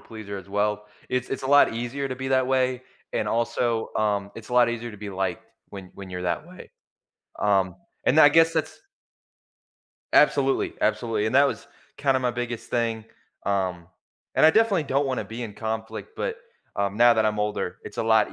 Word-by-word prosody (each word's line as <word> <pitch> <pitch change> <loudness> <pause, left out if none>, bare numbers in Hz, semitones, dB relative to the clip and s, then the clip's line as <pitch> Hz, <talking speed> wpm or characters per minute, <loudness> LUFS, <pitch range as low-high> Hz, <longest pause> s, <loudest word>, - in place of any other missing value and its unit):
pleaser 105 -3 -8
as 95 0 -10
well. 105 +1 -1 0.2
It's 125 0 -1
it's 135 - -4
a - - -3
lot 145 +1 +5
easier 120 +4 -3
to 130 - -4
be 130 0 -4
that 130 -1 +2
way 130 -1 +1 0.3
and 105 - -1
also, 115 0 0
um, 100 -2 0
it's 115 - -10
a - - -8
lot 120 -1 +6
easier 120 0 -4
to 105 - -11
be 100 0 -7
liked 95 -2 -3 0.3
when 95 -2 -9
when 95 -1 -10
you're 90 0 -5
that 90 - -2
way. 180 0 -13 0.7
Um, 95 -3 +2 0.3
and 145 - +4
then 155 - +9
I - - +9
guess 165 +2 +5
that's 160 -1 -2 1.3
Absolutely, 380 -2 +3
absolutely, 115 - 0
and 110 - -2
that 140 +1 +6
was 140 - -4 0.3
kinda 135 -2 +2
my 125 -1 +1
biggest 120 -1 -5
thing, 115 -2 -1 0.4
um, 95 -4 -1 0.5
and - - +6
I - - +8
definitely 200 -4 +3
don't 140 +1 +1
wanna 130 -1 -2
be 115 +2 -7
in 105 -3 -7
conflict, 110 - -5
but, 465 0 -2 0.4
um, 100 0 -1
now 120 +1 +6
that 110 -1 +2
I'm 105 -1 -1
older, 105 0 -2
it's - - -10
a - - 0
lot 110 -1 +3
115 Hz, 195 wpm, -25 LUFS, 105-135 Hz, 1.3 s, then